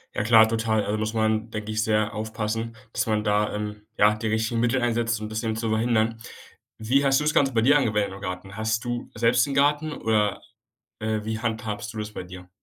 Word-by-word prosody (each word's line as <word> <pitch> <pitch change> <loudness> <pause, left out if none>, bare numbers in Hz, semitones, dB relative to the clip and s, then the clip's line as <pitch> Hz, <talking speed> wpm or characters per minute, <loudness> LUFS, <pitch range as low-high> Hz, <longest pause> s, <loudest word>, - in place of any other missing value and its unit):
Ja - - 0
klar, 110 0 +7
total. 110 -1 0
Also 105 +1 -1
muss 110 0 -2
man, 110 0 +1
denke 110 -1 -5
ich, 110 0 0
sehr 110 0 +1
aufpassen, 110 +1 -3 0.2
dass 125 - -1
man 105 -1 +1
da, 105 0 +1
ähm, 105 0 -5 0.2
ja, 105 +1 +5
die 110 +1 -4
richtigen 110 +1 0
Mittel 120 +3 +2
einsetzt, 115 -2 0
um's 110 0 -5
bisschen 110 0 -2
zu 110 0 -2
verhindern. 110 0 +1 0.6
Wie 125 +6 +2
hast 135 -1 +4
du - - -2
das 150 0 +1
Ganze 140 -4 +3
bei 115 - +3
dir 145 +5 +5
angewendet 105 -6 0
im 100 - -10
Garten? 90 +1 -6
Hast 110 +2 -1
du 120 0 -4
selbst 115 +2 +3
'n 140 - -3
Garten 145 +2 +2
oder, 105 -6 0 0.6
äh, 110 0 -1
wie 110 +1 -3
handhabst 110 -2 -3
du 110 - -6
das 105 0 -5
bei - - -5
dir? 90 0 -11
110 Hz, 220 wpm, -25 LUFS, 105-115 Hz, 0.6 s, klar